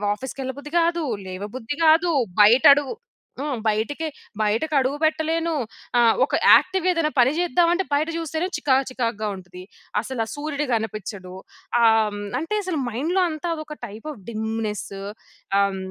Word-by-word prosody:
ఆఫీస్‌కెళ్ళబుద్ధి 265 +4 -7
కాదు. 340 0 +1 0.2
లేవబుద్ధి 210 +8 -6
కాదు. 335 +2 +5 0.3
బయట 235 +5 +6
అడుగు 290 +6 -2 0.4
హ్మ్. 280 -3 -2
బయటకి, 255 +10 -1 0.3
బయటకి 225 +9 0
అడుగు 270 +2 +1
పెట్టలేను. 320 +1 +1 0.5
ఆహ్, 230 -1 +5
ఒక - - -2 0.2
యాక్టివ్ 370 -1 +3
ఏదైనా 330 -3 +1
పని 250 +2 +5
చేద్దామంటే 350 +1 +2
బయట 300 +3 +2
చూస్తేనే 325 +1 -2
చికాకు 270 -1 +2
చికాకుగా 230 -4 -2
ఉంటది. 180 0 -11 0.4
అసలా 235 -1 -3
సూర్యుడు 295 0 -3
కనిపిచ్చడు.ఆహ్, 215 +1 -1
హ్మ్, 205 - -6 0.2
అంటే 330 +8 -2
అసలు 365 -4 -2
మైండ్‌లో 315 - 0
అంతా 315 +2 -4
అదొక 305 -1 -8
టైప్ 215 +8 -10
ఆఫ్ 210 - -15
డిమ్‌నెస్ 220 -1 -3 0.7
ఆహ్, 200 -1 0
270 Hz, 130 wpm, -23 LUFS, 220-315 Hz, 0.7 s, బయట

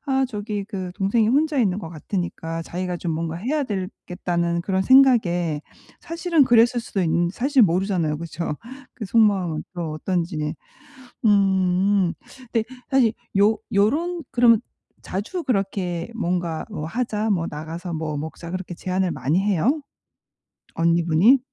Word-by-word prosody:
'아 265 -1 +2
저기 210 -3 -4
그 190 -3 -5
동생이 210 +3 +2
혼자 295 +4 +2
있는 200 -6 +2
것 170 - -6
같으니까 165 -1 -4
자기가 180 +1 -4
좀 170 -1 -3
뭔가 165 +1 -3
해야 275 - -1
되겠다.'는 180 -4 -2
그런 190 0 0
생각에 190 - +4 0.4
사실은 335 -2 +2
그랬을 240 0 +4
수도 200 -4 -2
있는 170 +1 +2
사실 260 +4 +3
모르잖아요, 180 -4 +1
그쵸? 165 -1 -4 0.4
그 225 - -6
속마음은 195 -7 +2
또 170 -3 -3
어떤지. 155 -2 -2 0.7
음. 190 -2 +3 0.4
근데 225 -2 +1 0.3
사실 255 -5 +4 0.3
요 210 +2 +4 0.2
요런 320 - +1
그러면 235 -3 +5 0.4
자주 225 - -4
그렇게 195 -6 -1
뭔가 175 -6 -2
어 190 -7 -5
"하자." 220 +2 -2
뭐 170 -4 +1
"나가서 165 +4 -6
뭐 155 -2 -3
먹자." 160 +3 -6
그렇게 185 -1 -5
제안을 185 +1 -1
많이 145 +4 0
해요? 210 - +1 0.9
언니분이? 170 - +4
190 Hz, 285 characters per minute, -23 LUFS, 170-225 Hz, 0.9 s, 그러면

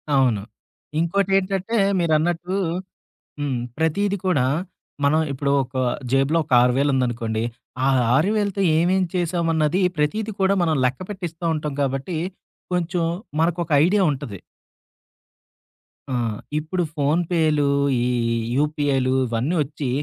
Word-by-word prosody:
అవును. 125 -6 +3 0.6
ఇంకోటేంటంటే 195 +4 +1 0.2
మీరన్నట్టు 170 +2 +1 0.9
హ్మ్. 140 -4 -1 0.2
ప్రతీది 195 +6 +1
కూడా, 145 -9 +2 0.6
మనం 155 +3 +4
ఇప్పుడు 140 +1 -1
ఒక 130 - -19 0.4
జేబు‌లో 135 +4 +3
ఒక 145 - -10
6000 135 +3 +2
ఉందనుకోండి. 115 -3 -1 0.4
ఆ - - +4 0.3
6000తో 200 +5 +1 0.2
ఏమేం 185 +3 +2
చేశామన్నది 170 -1 +1 0.2
ప్రతీది 215 +9 0
కూడా 190 +1 +3
మనం 160 -3 +2
లెక్కపెట్టిస్తా 175 +4 -4
ఉంటాం 150 -2 -3
కాబట్టి, 135 +5 -2 0.6
కొంచెం 175 0 0 0.4
మనకొక 170 0 0 0.2
ఐడియా 200 +2 +3
ఉంటది. 130 -8 -6 1.7
ఆ! - - -1 0.5
ఇప్పుడు 175 +4 -2
ఫోనుపే‌లు, 155 0 +1 0.4
ఈ - - 0 0.5
యూపీఐలు 145 -3 +1 0.2
ఇవన్నీ 120 +9 -1
ఒచ్చి 145 -1 -5
160 Hz, 100 wpm, -22 LUFS, 140-180 Hz, 1.7 s, మనం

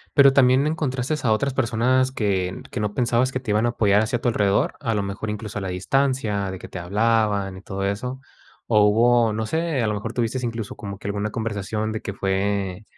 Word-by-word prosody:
pero, 140 -1 +7
también 130 0 +5
encontraste 145 -2 -2
a 110 - +3
otras 135 +5 +1
personas 130 +1 +2
que 95 -6 -1
que - - -3
no 105 -1 -2
pensabas 125 +1 +2
que 130 - -2
te 125 -5 -4
iban 105 +2 +2
a - - +2
apoyar 105 -3 +3
hacia 115 +2 -1
tu 125 - -2
alrededor, 100 -3 +1
a 115 -6 -1
lo 100 - 0
mejor 100 +2 -4
incluso 105 0 -4
a - - -7
la 95 - -3
distancia 105 0 0
de 95 - -6
que - - -9
te 90 - -7
hablaban 105 0 +1
y 95 - -10
todo 95 0 -4
eso. 125 +6 -3 0.5
O 105 -2 +4
hubo, 115 +1 +4
no 110 +1 -2
sé, 160 +1 -1
a 110 - +1
lo 105 - 0
mejor 110 +2 -4
tuvistes 125 +1 -1
incluso 115 -3 -4
como 100 -1 -7
que 100 - -8
alguna 100 +1 -2
conversación 110 -1 -3
de 110 - -4
que 100 - -5
fue, 95 0 -1
110 Hz, 220 wpm, -23 LUFS, 100-125 Hz, 0.5 s, pero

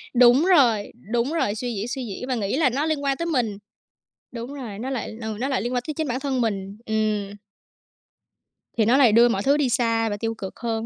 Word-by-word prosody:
Đúng 245 +5 +6
rồi, 250 - +4 0.2
đúng 240 +5 0
rồi, 215 -11 0
suy 245 +2 -3
diễn, 205 +3 -3
suy 255 +1 -4
diễn 225 +4 -6
và 260 - 0
nghĩ 205 +2 -1
là 300 -4 +3
nó 275 +5 -1
liên 310 -3 -1
quan 275 -1 0
tới 335 - -3
mình. 245 -11 -1 0.8
Đúng 240 +3 -6
rồi, 235 -8 -7
nó 255 +4 -4
lại, 240 -4 -4
ừ, 220 -1 -4
nó 265 - -1
lại 270 - 0
liên 245 +2 -3
quan 245 - 0
tới 305 - -4
chính 315 0 -2
bản 255 +1 -2
thân 270 -2 -1
mình. 200 -3 -2
Ừm. 215 -2 -1 1.4
Thì 220 - +3
nó 240 +5 +4
lại 255 -5 +6
đưa 235 +3 +6
mọi 200 -4 -1
thứ 280 +2 +3
đi 285 -4 +1
xa 230 -2 +1
và 205 - -3
tiêu 225 +2 -2
cực 190 -3 -8
hơn 225 -1 -2
240 Hz, 240 wpm, -23 LUFS, 220-270 Hz, 1.4 s, Đúng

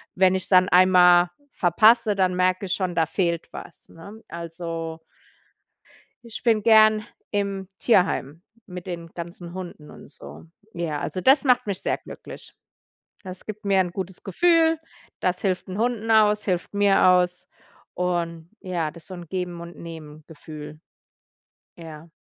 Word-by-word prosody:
Wenn 185 0 +4
ich's 185 -1 -3
dann 185 -1 +5
einmal 180 -1 +5 0.2
verpasse, 215 +4 +4
dann 185 -2 +1
merke 185 +1 +1
ich 180 - -1
schon, 185 -3 -2
da 165 -1 +2
fehlt 170 -1 -2
was, - - -11
ne? 200 +7 -13
Also 165 -1 -6 1.2
ich 230 - -9
bin 225 -3 +2
gerne 215 -1 +5 0.3
im 200 -2 -2
Tierheim 180 - +1 0.2
mit 180 -1 -9
den 170 -2 -6
ganzen 170 0 -8
Hunden 175 -5 -9
und - - -14
so. - - -12 0.3
Ja, 165 -4 -3
also 185 - -4
das 265 +9 +4
macht 250 -5 +2
mich 200 -2 -3
sehr - - -1
glücklich. - - -12 0.7
Das 185 -1 -10
gibt 215 0 -8
mir 195 -1 +3
'n 180 -2 0
gutes 190 0 -6
Gefühl, 325 - +3 0.4
das 180 0 -1
hilft 185 -3 -1
'n 185 - -5
Hunden 225 -1 -1
aus, 210 -1 +4
hilft 180 -1 -2
mir 200 -1 +3
aus 180 -1 +2 0.5
und, 170 -2 -3
ja, 175 -5 -3
das 165 0 -14
ist - - -13
so 190 - -9
'n 175 -2 -9
Geben-und-Nehmen-Gefühl. 160 -4 -8 1.0
Ja. 165 -1 -11
180 Hz, 145 wpm, -24 LUFS, 170-200 Hz, 1.2 s, dann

